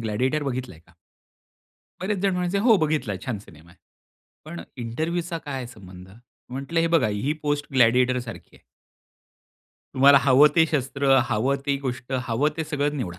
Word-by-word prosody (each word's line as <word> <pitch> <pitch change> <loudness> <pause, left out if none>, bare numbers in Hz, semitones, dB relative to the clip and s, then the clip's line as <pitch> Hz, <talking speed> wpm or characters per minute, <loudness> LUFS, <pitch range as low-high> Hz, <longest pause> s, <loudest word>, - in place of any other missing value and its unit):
Gladiator 125 +7 -1
बघितलंय 130 - -5
का?" 85 - -24 1.1
बरेच 195 +2 -2
जण 195 -1 +2
म्हणायचे, 180 +2 -1
"हो 225 +1 +5
बघितला 150 - -1
छान 120 -5 -3
सिनेमा 85 -4 -17
आहे. 90 - -22 0.7
पण 85 - -8 0.2
इंटरव्ह्यूचा 165 +8 -3
काय 135 -5 -6
संबंध." 95 -6 -13 0.4
म्हंटलं, 140 +6 -2
"हे 165 - +2
बघा 165 -8 +2
ही 105 +8 -1
पोस्ट 145 -1 -1
ग्लॅडिएटर 125 0 +3
सारखी 120 -3 -10
आहे." - - -24 1.3
तुम्हाला 140 +1 +7
हवं 135 +3 +6
ते 165 - +5
शस्त्र, 140 -2 0 0.2
हवं 130 +6 +1
ती 140 -1 +1
गोष्ट 120 +1 -5 0.2
हवं 125 +6 +1
ते 160 - -2
सगळं 145 -1 -1
निवडा. 95 -10 -5
135 Hz, 155 wpm, -24 LUFS, 115-155 Hz, 1.3 s, तुम्हाला